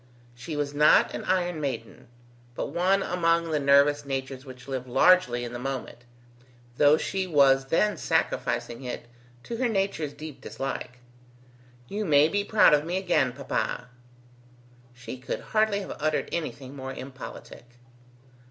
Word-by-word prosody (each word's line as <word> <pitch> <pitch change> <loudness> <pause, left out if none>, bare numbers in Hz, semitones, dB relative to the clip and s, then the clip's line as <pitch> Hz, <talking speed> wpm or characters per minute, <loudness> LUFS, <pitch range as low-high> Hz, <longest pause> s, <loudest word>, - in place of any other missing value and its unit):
She 125 +6 -7
was 145 -1 -2
not 150 +1 +5
an - - -5
iron 180 -3 0
maiden, 135 -5 -5 0.5
but - - -3
one 185 +4 +2
among 170 -1 +1
the 150 - +1
nervous 140 +1 +4
natures 135 -1 -5
which 130 -1 -12
live 130 -2 -4
largely 125 -2 +4
in 120 0 -6
the 120 - -5
moment, 130 -2 -5 0.7
though 145 +1 +6
she 190 +3 -2
was 135 -4 +4
then 205 +9 +1
sacrificing 115 - -1
it 125 -1 -5 0.4
to 235 - -5
her 250 0 +1
nature's 195 -8 -1
deep 150 -4 -9
dislike. 130 -2 -5 0.9
"You 210 +7 -3
may 150 -4 +4
be 205 +2 0
proud 210 -5 +5
of 150 0 +4
me 175 +3 -2
again, 175 -9 +1
papa." 125 -1 -3 1.1
She 125 +1 -8
could 125 - -4
hardly 215 -2 +2
have 195 - -7
uttered 155 0 0
anything 145 -5 -5
more 135 -1 -6
impolitic. 130 -2 -9
145 Hz, 145 wpm, -26 LUFS, 130-175 Hz, 1.1 s, though